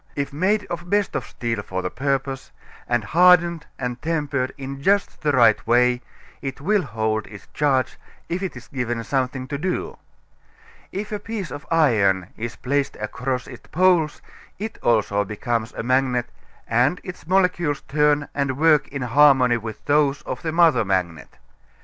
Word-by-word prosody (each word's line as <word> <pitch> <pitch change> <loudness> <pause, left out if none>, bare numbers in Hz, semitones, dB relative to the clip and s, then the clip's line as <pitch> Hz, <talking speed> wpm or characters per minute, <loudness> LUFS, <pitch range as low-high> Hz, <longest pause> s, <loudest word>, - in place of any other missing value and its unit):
If 140 0 -3
made 200 +7 +1
of 170 - -4
the 175 - -14
best 205 +2 0
of - - -2
steel 115 -3 -3
for 95 -2 -4
the 90 - -3
purpose 135 -1 -2 0.4
and 120 -2 +1
hardened 170 - +4
and 125 -1 -4
tempered 145 -5 -1
in 135 0 -7
just 200 +5 +1
the 150 - +2
right 120 -4 +4
way, 125 +1 +3 0.4
it 135 -1 -5
will 200 +7 +2
hold 110 - -2
its 105 -2 -12
charge 135 -3 +1 0.3
if 175 +2 -3
it 190 -9 -4
is 125 - -12
given 120 -3 -3
something 130 0 -2
to 140 -1 -3
do. 180 +3 -3 0.9
If 205 +3 -5
a 210 - -2
piece 205 -5 -5
of 145 - -8
iron 105 - +3
is 115 -1 -5
placed 140 +2 -1
across 125 +4 -3
its 125 -3 -12
poles 175 -3 +2 0.3
it 220 +3 -6
also 105 -3 +2
becomes 110 +3 -2
a - - -5
magnet 125 -1 +1 0.4
and 125 +9 +2
its 180 -4 -9
molecules 180 -5 +1
turn 150 0 +1
and 135 -2 -1
work 155 -1 +4
in 135 -2 -5
harmony 130 -1 +5
with 110 -1 -8
those 145 -1 +2
of 130 - -5
the 160 - -2
mother 165 -5 +4
magnet. 90 -5 -2
135 Hz, 165 wpm, -22 LUFS, 120-165 Hz, 0.9 s, harmony